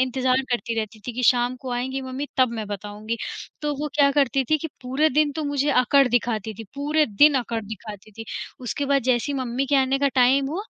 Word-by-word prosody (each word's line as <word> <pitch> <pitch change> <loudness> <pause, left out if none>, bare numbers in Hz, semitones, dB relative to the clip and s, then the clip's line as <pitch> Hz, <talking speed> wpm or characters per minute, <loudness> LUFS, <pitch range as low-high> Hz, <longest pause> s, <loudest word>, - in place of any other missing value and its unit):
इंतज़ार 260 0 +1
करती 235 -1 -1
रहती 215 0 -4
थी 245 - -3
कि 250 - -3
शाम 245 0 0
को 260 - -6
आएँगी 260 +2 -2
मम्मी 260 +2 -5
तब 255 -2 +4
मैं 215 - -4
बताऊँगी, 210 +2 -5 0.5
तो 295 -1 -1
वो 300 - -2
क्या 285 -1 +5
करती 275 -2 +2
थीं 310 - +4
कि 320 - -4 0.2
पूरे 265 +5 +2
दिन 300 +1 +2
तो 310 +1 -4
मुझे 285 0 0
अकड़ 275 +1 +4
दिखाती 225 -3 0
थी, 225 - -9
पूरे 300 +2 +1
दिन 290 +7 +5
अकड़ 230 -2 -3
दिखाती 215 0 -9
थी, 225 +2 -8 0.4
उसके 255 +3 -3
बाद 275 -1 +2
जैसे 255 +3 +1
ही 275 - -2
मम्मी 255 +1 -2
के 285 - +2
आने 270 0 +2
का 280 - +2
टाइम 265 +2 +4
हुआ, 365 +6 -3
260 Hz, 225 wpm, -23 LUFS, 235-280 Hz, 0.5 s, क्या